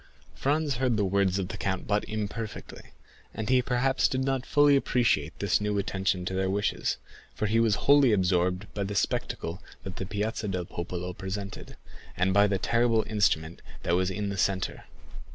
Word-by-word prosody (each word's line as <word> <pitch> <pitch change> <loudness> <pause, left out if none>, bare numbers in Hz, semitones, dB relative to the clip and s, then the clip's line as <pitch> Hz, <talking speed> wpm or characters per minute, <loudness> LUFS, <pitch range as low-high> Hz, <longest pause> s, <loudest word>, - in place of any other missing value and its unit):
Franz 145 -1 0
heard 125 -3 +1
the 105 - +2
words 95 0 +2
of 95 -2 -2
the - - -5
count 95 -1 -2
but 105 0 +1
imperfectly, 110 +1 -6 0.4
and 110 -1 -3
he 130 -1 +5
perhaps 130 +2 +2
did 130 - -1
not 135 -1 -1
fully 145 -1 +5
appreciate 120 - +1
this 100 0 +1
new 105 0 0
attention 95 -2 -1
to 95 - -3
their 95 0 0
wishes; 100 +2 0 0.4
for - - -1
he 110 +2 +2
was 115 -3 +3
wholly 140 -3 +6
absorbed 90 -1 +1
by 100 - -2
the 100 +1 -4
spectacle 85 -2 -2 0.2
that 95 - -7
the 95 - -3
Piazza 105 +1 -2
del 90 -2 -2
Popolo 90 +1 -5
presented, 95 +1 -6 0.4
and 95 +1 +2
by 100 +1 +5
the 100 -1 0
terrible 115 +2 +2
instrument 95 -7 0 0.2
that - - 0
was 90 +1 +1
in 100 +2 -3
the 100 -1 -4
centre. 95 0 -1
100 Hz, 180 wpm, -28 LUFS, 95-115 Hz, 0.4 s, wholly